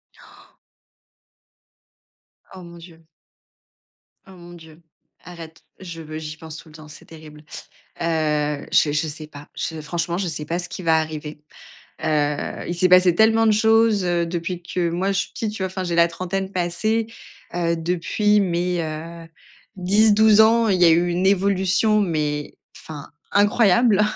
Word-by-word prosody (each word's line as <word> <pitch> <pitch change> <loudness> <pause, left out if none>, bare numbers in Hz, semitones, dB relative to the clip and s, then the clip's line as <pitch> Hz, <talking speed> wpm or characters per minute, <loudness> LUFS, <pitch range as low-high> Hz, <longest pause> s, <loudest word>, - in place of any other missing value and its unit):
Han. - - -19 2.1
Oh 185 -1 -11
mon 170 0 -12
Dieu. 165 -1 -16 1.2
Oh 190 - -16
mon 175 -1 -13
Dieu. 160 -1 -15 0.4
Arrête, 165 -2 -12 0.2
je 170 -3 -9
veux 155 0 -8
j'y 155 0 -8
pense 160 0 -10
tout 160 - -14
le 155 - -17
temps, 155 -1 -13
c'est 150 - -14
terrible. 155 -2 -14 0.6
Heu, 150 -3 -1
je 145 - +3
je 150 +2 0
sais 155 +1 -7
pas. 145 -1 -13
Je 160 -1 -4
franchement, 170 +3 -3
je 190 -3 -2
sais 150 -1 -4
pas 170 +3 -3
ce 175 - -4
qui 185 - -8
va 160 -1 +3
arriver. 155 -1 -6 0.6
Heu, 150 -2 -1
il 175 - -2
s'est 185 +2 +2
passé 180 -1 +5
tellement 225 +2 +4
de 215 - +4
choses, 220 -2 +3
heu, 175 -1 0
depuis 175 +1 -4
que 175 -1 -2
moi, 185 +3 -1
je 195 - -1
suis - - -5
petite, 215 -2 -4
tu 195 - -5
vois, - - 0
enfin, 185 0 -5
j'ai 175 -1 -3
la 170 0 +5
trentaine 190 +3 -4
passée. 215 +6 -1 0.5
Heu, 170 -1 0
depuis 180 +5 +1
mes, 175 -1 -1
heu, 165 +2 -7 0.5
10-12 210 +3 +4
ans, 225 +1 +4
il 185 -2 +1
y 170 - +7
eu 170 +2 +3
une 180 +2 0
évolution, 195 +2 +2
mais 150 -5 -2 0.2
enfin 150 -3 -10 0.2
incroyable. 205 +1 +3
175 Hz, 165 wpm, -21 LUFS, 160-195 Hz, 2.1 s, y